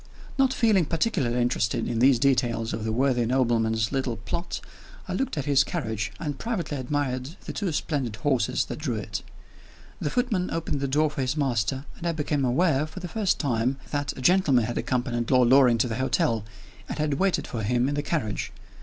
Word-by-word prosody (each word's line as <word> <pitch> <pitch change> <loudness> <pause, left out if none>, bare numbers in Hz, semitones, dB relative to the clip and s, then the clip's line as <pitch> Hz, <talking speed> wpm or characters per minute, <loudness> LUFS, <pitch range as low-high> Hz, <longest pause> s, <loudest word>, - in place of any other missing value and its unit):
Not 270 -1 +3
feeling 215 -9 +3
particularly 145 - 0
interested 120 -3 0
in 115 - -1
these 130 +1 +5
details 120 -3 +1
of 110 0 -3
the 110 - -1
worthy 125 +1 +2
nobleman's 115 -3 +1
little 130 -4 -1
plot, 170 +10 -4 0.5
I - - -3
looked 265 -10 -2
at 140 - -2
his 140 -2 +4
carriage, 110 - -3
and 145 -4 -4
privately 195 -10 -2
admired 130 +2 -2
the - - -5
two 200 -5 -2
splendid 140 -7 -2
horses 125 0 +1
that - - -6
drew 135 -6 -2
it. 105 -2 -4 0.8
The 150 - -1
footman 215 - 0
opened 165 -3 -2
the 140 - -1
door 150 +3 +2
for 140 - -3
his 130 +3 -1
master, 130 -1 0
and 170 - -3
I 170 - +1
became 150 -2 -1
aware, 145 +3 +2
for 160 +4 -9
the 180 - -5
first 205 +2 0
time, 130 -2 0
that 145 -2 -2
a - - -6
gentleman 145 -6 +4
had 120 - -2
accompanied 120 -2 -1
Lord 125 -2 +5
Loring 130 -3 +6
to 115 - +2
the 115 -1 -3
hotel, 130 - +1 0.4
and - - -4
had 150 -1 0
waited 195 -1 +1
for 115 - -4
him 120 +4 +1
in 145 - -1
the 145 - 0
carriage. 130 - -2
135 Hz, 200 wpm, -26 LUFS, 120-155 Hz, 0.8 s, Loring